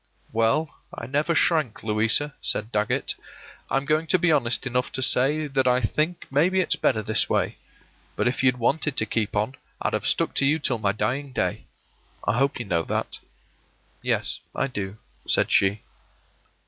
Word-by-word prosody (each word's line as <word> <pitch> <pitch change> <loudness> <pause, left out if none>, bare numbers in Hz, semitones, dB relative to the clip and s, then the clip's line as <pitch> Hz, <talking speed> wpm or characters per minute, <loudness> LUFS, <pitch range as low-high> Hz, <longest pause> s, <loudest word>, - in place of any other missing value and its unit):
“Well, 115 +8 +1
I - - -7
never 145 +6 0
shrank, 155 -11 +1
Louisa,” 110 +7 +2
said 110 +2 -1
Dagget. 115 +6 0 0.6
“I'm 135 +1 0
going 155 +2 +1
to 170 - +3
be 175 -1 +2
honest 120 -5 +1
enough 125 0 -1
to 130 - -2
say 145 +6 +3
that 135 -2 0
I 125 0 +4
think 155 +9 -1
maybe 170 +7 +3
it's 185 - +2
better 110 -5 +1
this 110 0 +1
way; - - 0 0.6
but - - +1
if 125 - 0
you'd 130 -1 +3
wanted 145 +4 0
to 110 - +2
keep 110 -1 -2
on, 105 +6 -1 0.2
I'd - - -1
have - - -1
stuck - - +2
to 140 - +4
you 150 +3 +3
till 125 -7 -1
my 100 -2 +1
dying 125 +7 -2
day. - - -2 0.6
I 105 - +2
hope 140 +1 +1
you 120 - -5
know 85 -4 +1
that.” - - -3 0.8
“Yes, - - -1 0.2
I - - +1
do,” 100 -6 -5 0.3
said - - +2
she. 100 +2 +3
130 Hz, 175 wpm, -25 LUFS, 110-150 Hz, 0.8 s, I